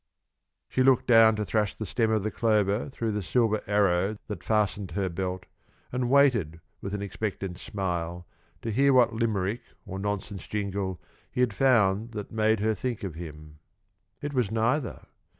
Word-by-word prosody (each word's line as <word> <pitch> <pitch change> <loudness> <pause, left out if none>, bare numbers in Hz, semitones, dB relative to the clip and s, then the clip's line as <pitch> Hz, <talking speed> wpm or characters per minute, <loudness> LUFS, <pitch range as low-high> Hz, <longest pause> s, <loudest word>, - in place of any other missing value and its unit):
She 130 - 0
looked 130 -1 +4
down 115 -2 +6
to 105 0 -2
thrust 105 -1 0
the 110 - -4
stem 110 +4 0
of 110 -2 +1
the 110 - -1
clover 105 0 +1
through 115 -4 -2
the 105 0 -2
silver 110 +2 +1
arrow 100 0 +2
that 105 - -6
fastened 105 -3 0
her 95 +2 -1
belt, 90 +1 -4 0.5
and 125 -1 -1
waited 120 - +3 0.2
with 100 +1 -4
an 100 - -3
expectant 100 -3 -4
smile 90 -4 -3 0.4
to 115 - -2
hear 140 +5 +4
what 125 -3 +5
Limerick 110 -1 -1 0.2
or 95 - -6
nonsense 100 -1 -4
jingle 100 -3 -3 0.3
he 125 - -1
had 125 -4 +2
found 115 -3 +3
that 105 -2 -6
made 110 0 +2
him 110 +1 +2
think 120 -1 -4
of 95 -4 -4
her. 80 0 -6 0.9
It 145 0 -3
was 125 -6 +1
neither. 115 +5 -1
105 Hz, 170 wpm, -27 LUFS, 95-115 Hz, 0.9 s, down